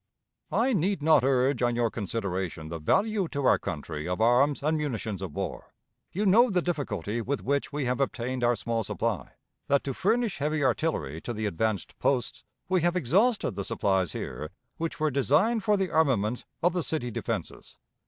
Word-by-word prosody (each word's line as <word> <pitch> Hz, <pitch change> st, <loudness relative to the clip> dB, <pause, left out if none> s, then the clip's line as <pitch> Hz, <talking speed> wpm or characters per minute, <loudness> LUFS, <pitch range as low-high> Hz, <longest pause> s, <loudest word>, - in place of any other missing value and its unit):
"I 255 Hz, +3 st, +2 dB
need 190 Hz, -3 st, 0 dB
not 155 Hz, -4 st, +5 dB
urge 130 Hz, -1 st, +2 dB
on 120 Hz, -1 st, +2 dB
your 120 Hz, -2 st, +1 dB
consideration 95 Hz, -6 st, -3 dB
the 85 Hz, 0 st, -5 dB
value 195 Hz, -, +1 dB
to 140 Hz, -3 st, -3 dB
our -, -, +5 dB
country 75 Hz, +2 st, -5 dB
of 90 Hz, -, -2 dB
arms 125 Hz, +6 st, +3 dB
and 155 Hz, +2 st, +2 dB
munitions 115 Hz, -, -3 dB
of 90 Hz, -6 st, -6 dB
war: -, -, -5 dB, 0.4 s
you 205 Hz, +4 st, -1 dB
know 230 Hz, +6 st, +6 dB
the 185 Hz, -4 st, +2 dB
difficulty 120 Hz, -, -2 dB
with 135 Hz, +4 st, -2 dB
which 140 Hz, +1 st, 0 dB
we 145 Hz, -2 st, -2 dB
have 125 Hz, +1 st, 0 dB
obtained 130 Hz, -1 st, -2 dB
our 120 Hz, 0 st, +4 dB
small 115 Hz, +1 st, -2 dB
supply; -, -, -2 dB, 0.3 s
that, 140 Hz, 0 st, +2 dB
to 135 Hz, -, -3 dB
furnish 220 Hz, -, 0 dB
heavy 150 Hz, +1 st, 0 dB
artillery 120 Hz, -, 0 dB
to 120 Hz, -, -4 dB
the 110 Hz, -1 st, -3 dB
advanced 105 Hz, +2 st, -1 dB
posts, 125 Hz, -4 st, 0 dB, 0.2 s
we 185 Hz, -1 st, +2 dB
have 175 Hz, +2 st, +2 dB
exhausted 190 Hz, -, +2 dB
the 100 Hz, -, -3 dB
supplies 95 Hz, -3 st, 0 dB
here 75 Hz, +1 st, -5 dB, 0.3 s
which 165 Hz, 0 st, -3 dB
were 155 Hz, -1 st, +1 dB
designed 155 Hz, -, +2 dB
for 210 Hz, -2 st, +3 dB
the 190 Hz, -4 st, -1 dB
armament 125 Hz, -8 st, +1 dB, 0.2 s
of 175 Hz, 0 st, +3 dB
the 180 Hz, -, 0 dB
city 140 Hz, -7 st, -2 dB
defenses. -, -, -5 dB
135 Hz, 185 wpm, -28 LUFS, 110-165 Hz, 0.4 s, know